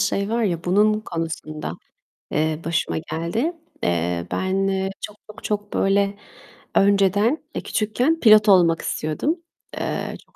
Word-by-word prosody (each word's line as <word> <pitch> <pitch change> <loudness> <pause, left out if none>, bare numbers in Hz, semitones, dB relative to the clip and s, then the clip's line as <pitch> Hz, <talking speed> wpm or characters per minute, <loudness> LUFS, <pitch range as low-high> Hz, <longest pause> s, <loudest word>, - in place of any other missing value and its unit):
şey 200 0 0
var 230 +1 0
ya, 170 -5 -1
bunun 210 +4 +3
konusunda, 160 - -5 0.6
eee, 155 +1 0
başıma 165 -1 0
geldi. 170 - -2 0.3
Eee, 85 0 0
ben 195 +1 0 0.3
çok 210 - -6
çok 215 0 -13
çok 205 -1 -3
böyle, 200 +1 +2 0.6
önceden, 200 - +3
eee, - - -2
küçükken 250 +10 0
pilot 215 -2 +7
olmak 170 -4 +5
istiyordum. 155 - -1 0.4
Eee, - - -3
çok - - -34
195 Hz, 130 wpm, -22 LUFS, 165-215 Hz, 0.6 s, pilot